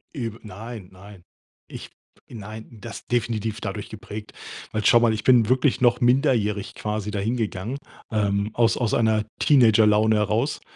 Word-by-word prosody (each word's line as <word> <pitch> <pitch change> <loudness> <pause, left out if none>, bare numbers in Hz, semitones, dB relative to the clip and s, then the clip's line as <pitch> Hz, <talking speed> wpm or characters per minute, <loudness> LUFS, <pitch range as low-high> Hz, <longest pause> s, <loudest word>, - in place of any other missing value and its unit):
Eb 115 -4 -5
nein, 110 -1 -9
nein. 95 0 -14 0.4
Ich - - -9 0.4
nein 110 0 -9
das 115 +2 -9
definitiv 115 -2 -1
dadurch 100 0 -5
geprägt. 110 -1 -9 0.4
Weil 110 -1 -3
schau 120 - +6
mal, 115 -2 +3
ich 110 - -4
bin 120 -3 +4
wirklich 130 0 +2
noch 120 0 +4
minderjährig 120 -6 +1
quasi 105 -1 -4
da 100 - -3
hingegangen, 110 +1 -2 0.3
ähm, 100 0 0
aus 115 -1 +2
aus 120 -4 -1
einer 110 -2 +2
Teenagerlaune 110 -5 +4
heraus. 110 +7 0
110 Hz, 145 wpm, -23 LUFS, 105-120 Hz, 0.4 s, schau